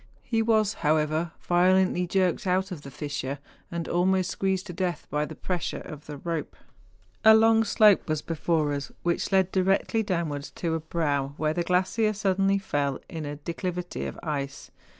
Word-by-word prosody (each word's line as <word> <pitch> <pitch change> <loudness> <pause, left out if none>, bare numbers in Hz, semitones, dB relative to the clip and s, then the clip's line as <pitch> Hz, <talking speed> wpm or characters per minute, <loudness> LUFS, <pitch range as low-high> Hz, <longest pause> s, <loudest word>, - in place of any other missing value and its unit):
He 225 -2 0
was, 220 -2 +2
however, 155 +1 +1
violently 180 0 +3
jerked 185 0 +1
out 190 +2 +1
of 170 -5 -6
the 140 - -9
fissure, 140 0 -4 0.3
and 170 -1 -4
almost 185 +1 +1
squeezed 190 0 -1
to 180 - -7
death 180 0 -2
by 150 0 0
the - - -9
pressure 180 -3 -3
of 150 -1 -10
the 150 -1 -6
rope. 165 +1 -4 0.7
A 220 0 +9
long 225 0 +5
slope 210 -4 +4
was 155 -1 -1
before 160 -2 0
us, 140 0 -4
which 175 +3 0
led 190 -1 +3
directly 195 +4 +2
downwards 165 -8 -2
to 165 -2 -2
a 165 - 0
brow 145 -4 -1
where 155 0 0
the 175 - -1
glacier 190 +5 +1
suddenly 195 -1 +2
fell 145 -8 -1
in 160 -4 -5
a 145 - -4
declivity 175 +3 -4
of - - -7
ice. 145 -3 -4
175 Hz, 170 wpm, -27 LUFS, 150-190 Hz, 0.7 s, A